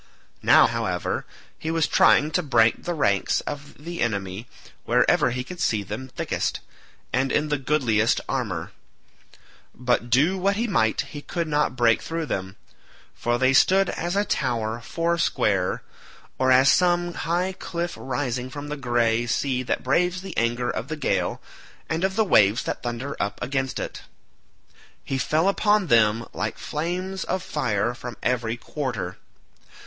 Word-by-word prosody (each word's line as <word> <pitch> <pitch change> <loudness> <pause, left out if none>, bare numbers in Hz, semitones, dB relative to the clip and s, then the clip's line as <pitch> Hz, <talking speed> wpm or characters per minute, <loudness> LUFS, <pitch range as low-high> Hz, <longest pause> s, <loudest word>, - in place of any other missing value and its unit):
Now, - - +7
however, - - -2 0.3
he 160 - -3
kept 165 -1 +1
trying 150 +1 +5
to 180 - +1
break 115 -7 +2
the 175 - -1
ranks 100 -10 +1
of 145 0 -7
the 170 0 -5
enemy 100 -1 -2 0.4
wherever - - +3
he 125 +1 -3
could 180 +7 -9
see 105 -2 +1
them 105 +6 -6
thickest, - - -2 0.5
and 135 +1 +1
in 150 0 +1
the 145 -1 0
goodliest 125 -6 +2
armour; 105 -12 -3 1.0
but 125 -1 0
do 155 +10 +3
what 195 +2 +2
he 230 +4 0
might 110 - +1
he 145 - -8
could 170 +2 -3
not 150 -4 +1
break 120 -2 +3
through 165 0 -3
them, 95 -7 -4 0.6
for 120 0 -1
they 130 +2 +3
stood 190 +7 +4
as 175 +2 -3
a 205 +1 +2
tower 115 - -1
foursquare, 165 - 0 0.6
or 130 0 +3
as 130 +2 +6
some 175 -1 +2
high 175 +4 -1
cliff 175 -1 -4
rising 130 -1 -3
from 145 +2 -7
the 150 - -4
grey 120 -2 +1
sea 130 +2 0
that 125 - -2
braves 180 +7 +1
the 190 -3 -7
anger 120 +1 0
of 120 - -4
the 155 - -3
gale, 95 -11 0 0.5
and 160 +3 -2
of 190 0 0
the 220 0 +3
waves 105 - +4
that - - -4
thunder 120 +3 -4
up 100 - -2
against 130 +1 -2
it. - - -5 1.0
He 135 - -2
fell 155 +7 +1
upon 205 0 +3
them 115 -4 +3
like 105 +1 -3
flames 180 +5 -3
of 185 0 -2
fire 120 -6 -1
from 120 -2 -8
every 120 -2 0
quarter. 120 -9 -4
130 Hz, 155 wpm, -24 LUFS, 115-165 Hz, 1.0 s, Now